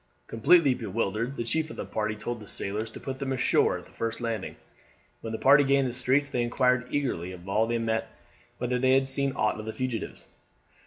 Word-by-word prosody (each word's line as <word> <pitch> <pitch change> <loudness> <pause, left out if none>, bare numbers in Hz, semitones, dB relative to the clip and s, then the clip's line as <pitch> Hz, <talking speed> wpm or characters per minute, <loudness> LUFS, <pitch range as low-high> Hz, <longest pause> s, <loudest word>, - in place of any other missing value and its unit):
Completely 140 +5 +4
bewildered, 115 +2 -2
the - - -1
chief 155 +7 -1
of - - -8
the - - -5
party 110 0 -2
told 120 +2 -5
the 105 - -12
sailors 105 +4 -3
to - - -10
put 130 -1 -5
them 135 -1 -3
ashore 130 -1 +2
at - - -11
the - - -19
first 115 0 -3
landing. 115 -4 -3 0.7
When 115 - -5
the 110 - -3
party 145 +4 +6
gained 140 -1 +3
the 120 - -4
streets 130 +3 +2
they 125 - -1
inquired 125 +1 +1
eagerly 95 -11 -2
of 90 +1 -12
all 110 +3 +1
they 120 0 0
met 115 -1 -1 0.5
whether 125 0 -1
they 130 +1 +3
had 135 0 +3
seen 135 +1 +3
aught 110 -3 0
of 110 - -7
the 110 - -4
fugitives. 130 -3 -4
120 Hz, 215 wpm, -27 LUFS, 110-135 Hz, 0.7 s, party